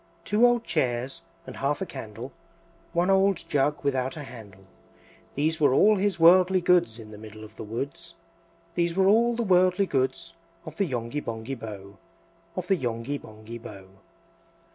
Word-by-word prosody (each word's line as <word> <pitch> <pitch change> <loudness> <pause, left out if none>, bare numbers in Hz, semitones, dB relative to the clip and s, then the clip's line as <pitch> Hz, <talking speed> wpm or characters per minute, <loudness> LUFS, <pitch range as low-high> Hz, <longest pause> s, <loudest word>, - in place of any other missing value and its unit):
Two 220 +4 +4
old 240 -1 +2
chairs, 130 - -1 0.2
and - - -9
half 140 +2 0
a 190 - -2
candle, 125 - -8 0.6
One 175 +3 +2
old 195 -1 +2
jug 145 +1 0
without 135 +1 -1
a 150 - -6
handle, 105 -7 -12 0.7
These 155 +3 0
were 145 -3 +4
all 210 +6 +5
his 195 -2 0
worldly 185 +3 +6
goods: 175 -9 +2
In 110 -2 -11
the 105 - -10
middle 110 0 -11
of 110 0 -13
the - - -7
woods, 135 +9 -6 0.6
These 170 -1 0
were 190 0 +3
all 230 +3 +4
the 235 - -1
worldly 185 -1 +3
goods 135 +2 -1 0.3
Of 155 -1 -9
the 200 - +2
Yonghy 120 +2 -3
Bonghy 115 +3 -5
Bò, 100 -4 -9 0.6
Of 185 - -3
the 190 +1 +2
Yonghy 120 +2 -3
Bonghy 110 +2 -10
Bò. 100 -4 -10
145 Hz, 165 wpm, -26 LUFS, 115-180 Hz, 0.7 s, worldly